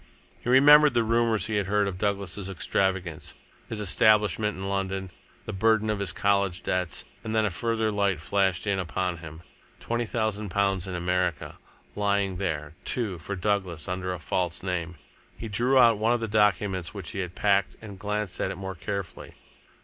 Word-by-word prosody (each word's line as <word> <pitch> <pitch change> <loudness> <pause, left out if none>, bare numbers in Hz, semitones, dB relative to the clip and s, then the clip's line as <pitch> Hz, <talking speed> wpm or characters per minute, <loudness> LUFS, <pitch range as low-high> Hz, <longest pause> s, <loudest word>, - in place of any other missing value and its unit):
He - - -4
remembered 145 +2 +7
the 120 - +4
rumours 115 -3 +2
he 110 -1 -1
had 100 -2 -1
heard 105 0 +2
of 90 -2 -5
Douglas' 100 -1 -2
extravagance, 95 -3 -1 0.3
his 110 - -4
establishment 105 +1 +3
in 95 +1 -4
London, 95 -1 -2 0.3
the 110 - -5
burden 110 +2 +2
of 105 - -2
his 100 -3 -1
college 100 -3 +1
debts. 90 -3 -2 0.2
And 110 0 -3
then 110 -1 +3
a 100 - 0
further 110 +3 0
light 100 -4 +1
flashed 95 +1 0
in 100 -2 0
upon 90 0 -2
him. 80 0 -10 0.4
Twenty 120 0 -2
thousand 110 -2 -2
pounds 95 -1 0
in 95 - -4
America! 90 -3 -1 0.4
lying 100 -2 0
there, 75 -6 -3
too, 105 -8 -2
for 100 +5 -5
Douglas 95 -5 -1
under 90 0 -3
a 90 - -3
false 90 0 -2
name! 90 -2 -3 0.4
He 115 - -6
drew 120 +6 +2
out 115 -4 +6
one 115 +2 +3
of 120 - +1
the 115 - -3
documents 105 -3 +1
which 95 -5 -6
he 100 - -5
had 90 -2 -4
packed 100 -1 +2
and 100 -3 -10
glanced 105 -1 -3
at - - 0
it - - -4
more 95 0 -5
carefully. 100 +1 -6
100 Hz, 180 wpm, -27 LUFS, 90-110 Hz, 0.4 s, remembered